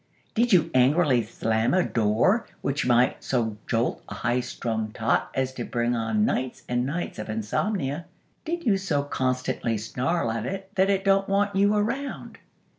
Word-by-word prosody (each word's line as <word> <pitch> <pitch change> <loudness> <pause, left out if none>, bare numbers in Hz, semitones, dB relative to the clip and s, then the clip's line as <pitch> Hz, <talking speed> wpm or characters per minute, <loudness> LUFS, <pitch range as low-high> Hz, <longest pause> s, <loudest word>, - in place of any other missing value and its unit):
Did 240 +1 +2
you 165 -3 +4
angrily 130 0 +4
slam 110 - 0
a 185 - +4
door, 115 - +2
which 140 -1 -1
might 125 +1 +3
so 115 -5 -1
jolt 115 +1 0
a - - -6
high 120 +1 0
strung 110 -3 -3
tot 115 -1 +1
as 130 0 0
to 125 - -4
bring 120 +1 -1
on 110 -2 +1
nights 130 -1 -2
and 125 +1 0
nights 165 -1 -4
of 105 - -6
insomnia? 140 - -2 0.4
Did 340 0 -3
you 205 -5 +4
so 160 -7 0
constantly 130 -4 -1
snarl 125 +5 -1
at 115 +1 -3
it 195 0 -5
that 190 0 +2
it 195 0 +1
don't 195 0 +3
want 200 0 +1
you 200 +2 +4
around? 235 +7 -3
130 Hz, 170 wpm, -26 LUFS, 115-195 Hz, 0.4 s, you